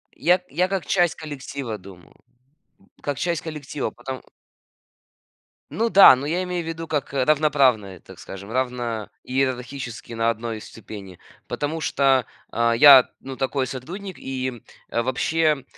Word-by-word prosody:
Я 180 +2 +3
я 180 +5 +1
как 190 -4 -2
часть 175 -3 +2
коллектива 140 -6 -6
думал, 95 -2 -15 0.9
как 145 -2 -3
часть 170 -2 -1
коллектива, 150 -3 -4
потому 130 +2 -7 1.5
Ну 230 +2 0
да, 195 -10 +9
но 130 +2 -5
я 175 +4 0
имею 180 -1 -3
в - - -9
виду, 165 0 -5
как, 145 -3 -2
э, 135 -2 +1
равноправная, 135 - +2
так - - -15
скажем, 100 +2 -9
равно 120 -3 -2
иерархически 130 -2 -3
на 115 0 +1
1 115 -1 -3
ступени, 100 -4 -11 0.3
потому 150 +3 -3
что, 135 -5 +2 0.3
а, 115 0 +2
я, 135 +1 +9
ну, 130 -1 -8
такой 135 0 0
сотрудник, 175 +10 -7
и, 130 -3 -4 0.3
э, 120 - 0
вообще, 150 +4 +1
135 Hz, 140 wpm, -23 LUFS, 120-155 Hz, 1.5 s, да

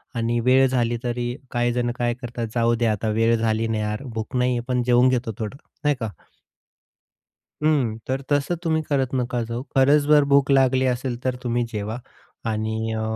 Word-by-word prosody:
आणि 115 +1 0
वेळ 130 +2 +4
झाली 120 -2 0
तरी 120 0 -2 0.2
काही 120 0 +1
जण 120 -1 0
काय 120 -1 0
करतात, 120 -2 -5
जाऊ 115 0 +3
द्या 115 -1 +1
आता 105 +1 -2
वेळ 115 +1 +4
झाली 110 0 0
ना 110 -1 -1
यार, 105 +4 -3
भूक 110 +2 -5
नाहीये 125 -1 +1
पण 125 -1 0
जेवून 125 +1 +4
घेतो 125 -2 0
थोडं, 110 +5 -4 0.3
नाही 145 -1 +3
का. 115 -2 -3 1.5
हम्म, 135 -8 +2
तर 135 +1 -1
तसं 145 +4 +1
तुम्ही 160 -1 +1
करत 135 -2 0
नका 125 -1 -1
जाऊ. 115 +2 -4
खरंच 140 +3 +5
जर 150 -1 +6
भूक 140 0 +4
लागली 130 -1 +4
असेल 125 -1 -1
तर 130 -1 0
तुम्ही 120 0 0
जेवा. 105 +2 -3 0.5
आणि 110 0 -2
अ, 110 - -2
120 Hz, 180 wpm, -23 LUFS, 115-130 Hz, 1.5 s, जर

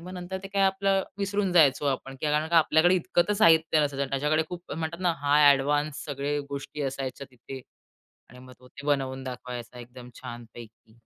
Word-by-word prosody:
मग 180 +2 -9
नंतर 180 +1 -6
ते 195 - -7
काय 200 0 0
आपलं 195 0 +2 0.2
विसरून 200 -1 -1
जायचो 150 -5 +4
आपण. 135 -1 -3
कारण 150 +1 0
का 170 0 +5
आपल्याकडे 160 +3 +4
इतकं 175 -1 +1
तर - - +2
साहित्य 160 -5 +4
नसायचं. 140 -1 -3
त्याच्याकडे 150 +3 +1
खूप 180 0 -8
म्हणतात 160 +3 -4
ना, 180 -2 +2
हाय 145 0 +6
एडवान्स 145 +2 -1
सगळे 145 +1 -2
गोष्टी 140 +1 -6
असायच्या 135 0 -4
तिथे. 130 +1 -10 0.7
आणि 125 - -14
मग 130 0 -14
तो 125 - -17
ते 140 +3 -12
बनवून 135 -2 -1
दाखवायचा 125 -1 -7
एकदम 120 +1 -12
छान 120 0 -8
पैकी. 115 0 -15
145 Hz, 185 wpm, -27 LUFS, 130-170 Hz, 0.7 s, हाय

